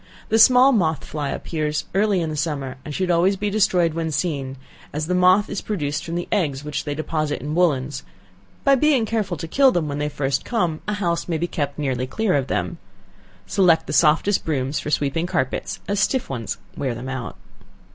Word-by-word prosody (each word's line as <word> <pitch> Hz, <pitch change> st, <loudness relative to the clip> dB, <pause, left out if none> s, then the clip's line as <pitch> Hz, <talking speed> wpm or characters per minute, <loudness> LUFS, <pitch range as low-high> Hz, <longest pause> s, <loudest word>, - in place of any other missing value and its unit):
The 225 Hz, -, +3 dB
small 250 Hz, +4 st, +7 dB
moth 160 Hz, -, +1 dB
fly 145 Hz, -2 st, -4 dB
appears 155 Hz, -2 st, -2 dB
early 200 Hz, -1 st, +2 dB
in 160 Hz, -1 st, -2 dB
the -, -, -4 dB
summer, 140 Hz, -4 st, -3 dB
and 150 Hz, -, -7 dB
should 180 Hz, +4 st, 0 dB
always 175 Hz, +3 st, +3 dB
be 205 Hz, +1 st, -2 dB
destroyed 180 Hz, -5 st, +2 dB
when 165 Hz, 0 st, -2 dB
seen, 140 Hz, -3 st, -2 dB, 0.3 s
as 150 Hz, +1 st, -2 dB
the 180 Hz, -, -1 dB
moth 185 Hz, +3 st, +4 dB
is 200 Hz, -, -4 dB
produced 150 Hz, -8 st, -2 dB
from 165 Hz, -, -5 dB
the 175 Hz, -, -3 dB
eggs 150 Hz, -9 st, 0 dB
which 150 Hz, -1 st, -4 dB
they 145 Hz, -1 st, -3 dB
deposit 155 Hz, -1 st, -2 dB
in 150 Hz, +2 st, -4 dB
woollens; 145 Hz, -6 st, +1 dB, 0.6 s
by 275 Hz, -, +5 dB
being 270 Hz, -3 st, +3 dB
careful 210 Hz, -6 st, -2 dB
to 165 Hz, -, -6 dB
kill 270 Hz, +9 st, +4 dB
them 170 Hz, -7 st, 0 dB
when 145 Hz, 0 st, -3 dB
they 150 Hz, 0 st, -1 dB
first 135 Hz, -2 st, -1 dB
come, 175 Hz, -10 st, -1 dB
a 210 Hz, -, 0 dB
house 170 Hz, -4 st, -1 dB
may 165 Hz, -2 st, -1 dB
be 170 Hz, -, -1 dB
kept 145 Hz, -4 st, -3 dB
nearly 130 Hz, -4 st, -1 dB
clear 220 Hz, +7 st, 0 dB
of 135 Hz, -2 st, +1 dB
them. 170 Hz, -, -2 dB, 0.7 s
Select 170 Hz, -5 st, +3 dB
the -, -, -5 dB
softest 165 Hz, +6 st, +3 dB
brooms 140 Hz, -2 st, -1 dB
for -, -, -5 dB
sweeping 150 Hz, +3 st, 0 dB
carpets, 130 Hz, -6 st, -2 dB
as 200 Hz, 0 st, 0 dB
stiff 250 Hz, -, 0 dB
ones 115 Hz, -4 st, -4 dB, 0.2 s
wear 130 Hz, -4 st, -2 dB
them 120 Hz, +3 st, -7 dB
out. 130 Hz, -4 st, -5 dB
160 Hz, 205 wpm, -22 LUFS, 145-190 Hz, 0.7 s, small